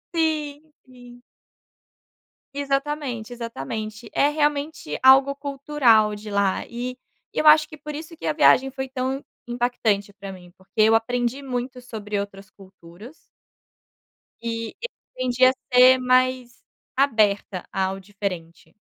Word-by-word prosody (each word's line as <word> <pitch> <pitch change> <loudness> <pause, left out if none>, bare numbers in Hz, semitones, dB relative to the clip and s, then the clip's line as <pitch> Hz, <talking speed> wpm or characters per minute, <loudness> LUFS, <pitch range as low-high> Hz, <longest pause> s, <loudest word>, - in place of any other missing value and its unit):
Sim, 305 -2 -1
sim. 245 -1 -15 1.3
Exatamente, 275 -4 -2
exatamente, 215 - -6
é 285 - +3
realmente 295 - -1
algo 270 +1 +6
cultural 275 -7 +2
de 210 0 -9
lá, 200 -1 0
e 250 +2 -5 0.4
eu 310 - -1
acho 305 0 +7
que 310 - -12
por 300 +1 -8
isso 320 +2 -8
que 335 - -9
a - - +1
viagem 270 -3 +4
foi 265 0 -5
tão 265 +1 -3 0.2
impactante 230 -5 -1
para 200 -1 -9
mim, 180 -2 -13
porque 190 +3 -3
eu 220 +1 +6
aprendi 245 +3 0
muito 250 -1 -4
sobre 210 -4 -5
outras 200 0 -7
culturas. 190 - -15 1.3
E 230 -1 -4 0.4
aprendi 255 0 +2
a 255 - +7 0.2
ser 255 +1 +8
mais 255 -1 +1 0.3
aberta 210 -8 +1
ao 190 0 -1
diferente. 190 -4 -7
245 Hz, 125 wpm, -23 LUFS, 210-275 Hz, 1.3 s, ser